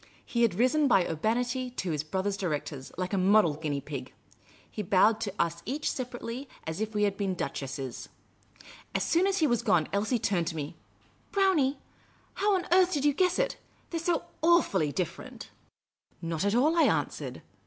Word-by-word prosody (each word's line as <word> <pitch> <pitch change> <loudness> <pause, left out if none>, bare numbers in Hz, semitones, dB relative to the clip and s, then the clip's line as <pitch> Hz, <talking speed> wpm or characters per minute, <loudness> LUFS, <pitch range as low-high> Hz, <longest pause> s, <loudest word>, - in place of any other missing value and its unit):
He 235 - -1
had 230 -6 +3
risen 255 +7 +3
by 190 -8 +4
urbanity 245 - -1
to 190 -8 -3
his 150 -2 -1
brother 190 +5 -1
directors, 150 -8 -4
like 185 +2 -3
a 195 - +2
model 190 -3 +5
guinea 145 -2 -3
pig. 135 -3 -6 0.6
He - - -4
bowed 210 +3 +3
to 205 -4 -2
us 170 0 0
each 285 +6 -2
separately 250 +1 -5 0.2
as 160 +5 -4
if 220 0 -3
we 210 - +2
had 200 -1 +1
been 195 -3 -1
duchesses. 135 -5 -5 0.9
As - - +1
soon 350 +3 +3
as 390 0 +1
he 320 - +3
was 240 -5 +2
gone, 180 -9 +2
Elsie 210 +5 +1
turned 185 -6 0
to - - -3
me. 150 -1 -5 0.3
" - - -35
Brownie, 340 -9 +3 0.6
how 410 0 +2
on 360 -1 -1
earth 370 0 +5
did 285 -3 0
3'ou 290 -2 +3
guess 365 0 +2
it? - - 0 0.3
They 335 - -1
're - - -6
so 335 -1 0 0.2
awfully 310 - +3
different!" 180 +2 -5 0.3
" - - -65 0.3
Not 165 +1 -2
at 205 +2 +2
all," 300 +7 +3
I 335 - +5
an.swered. - - -1
215 Hz, 190 wpm, -29 LUFS, 170-285 Hz, 0.9 s, model